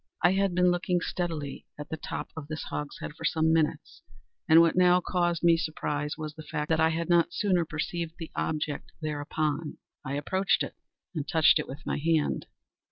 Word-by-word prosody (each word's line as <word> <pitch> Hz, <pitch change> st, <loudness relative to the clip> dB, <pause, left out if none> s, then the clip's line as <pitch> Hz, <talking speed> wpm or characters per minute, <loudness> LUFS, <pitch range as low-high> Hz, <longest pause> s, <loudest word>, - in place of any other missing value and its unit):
I 175 Hz, -, +6 dB
had 195 Hz, -1 st, +1 dB
been 180 Hz, 0 st, +4 dB
looking 175 Hz, 0 st, +1 dB
steadily 165 Hz, -6 st, -4 dB
at 150 Hz, 0 st, -8 dB
the -, -, -2 dB
top -, -, -5 dB
of 155 Hz, -3 st, -7 dB
this 155 Hz, 0 st, -5 dB
hogshead 150 Hz, 0 st, -5 dB
for -, -, -12 dB
some 160 Hz, -1 st, +2 dB
minutes, 160 Hz, -2 st, 0 dB, 0.5 s
and 160 Hz, -, +9 dB
what 165 Hz, -1 st, +5 dB
now 180 Hz, 0 st, +5 dB
caused 175 Hz, -2 st, 0 dB
me 170 Hz, -1 st, +6 dB
surprise 150 Hz, -2 st, -2 dB
was 155 Hz, -1 st, -5 dB
the 155 Hz, -, -10 dB
fact 150 Hz, 0 st, -4 dB
that 160 Hz, -, +2 dB
I 160 Hz, 0 st, +5 dB
had 165 Hz, +1 st, -2 dB
not 170 Hz, -1 st, +3 dB
sooner 185 Hz, -5 st, +2 dB
perceived 165 Hz, +2 st, -3 dB
the 165 Hz, -, -7 dB
object 150 Hz, -2 st, -2 dB
thereupon. 150 Hz, 0 st, -2 dB, 0.3 s
I 135 Hz, -, -3 dB
approached 190 Hz, +7 st, +1 dB
it, -, -, -6 dB, 0.4 s
and 150 Hz, -4 st, -3 dB
touched 160 Hz, -2 st, +5 dB
it -, -, -3 dB
with 140 Hz, +3 st, -9 dB
my -, -, -1 dB
hand. 160 Hz, 0 st, +1 dB
160 Hz, 190 wpm, -28 LUFS, 150-175 Hz, 0.5 s, and